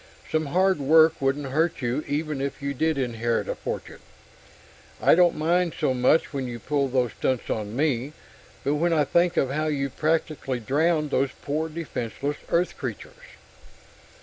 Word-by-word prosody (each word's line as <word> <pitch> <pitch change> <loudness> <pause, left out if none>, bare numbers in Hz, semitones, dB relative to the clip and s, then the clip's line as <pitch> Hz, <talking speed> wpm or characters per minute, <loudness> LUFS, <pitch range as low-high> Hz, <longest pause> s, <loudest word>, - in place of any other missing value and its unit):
Some 155 -1 0
hard 185 +3 +2
work 160 +2 +5
wouldn't 135 0 0
hurt 160 0 0
you 125 +5 -1
even 150 -1 -2
if 140 0 -3
you 140 0 -3
did 160 +2 0
inherit 120 -3 -1
a - - -1
fortune. - - -6 1.0
I - - +5
don't 175 0 +5
mind 170 +2 +1
so 130 - +2
much 130 +6 +2
when 135 -2 -2
you 120 -1 -5
pull 140 +4 0
these 125 -3 0
stunts 130 -2 -1
on 105 0 -3
me, 140 -1 0 0.5
but 140 - +1
when 165 +3 +1
I 155 -2 +3
think 170 +4 +2
of 135 - +2
how 155 +2 -1
you 140 -3 -1
practically 155 -4 -1
drowned 150 +5 +1
those 135 +1 +2
poor, 155 +3 -2
defenseless 145 -3 -4
Earth 175 +2 +1
creatures...." - - -8
145 Hz, 165 wpm, -25 LUFS, 130-160 Hz, 1.0 s, work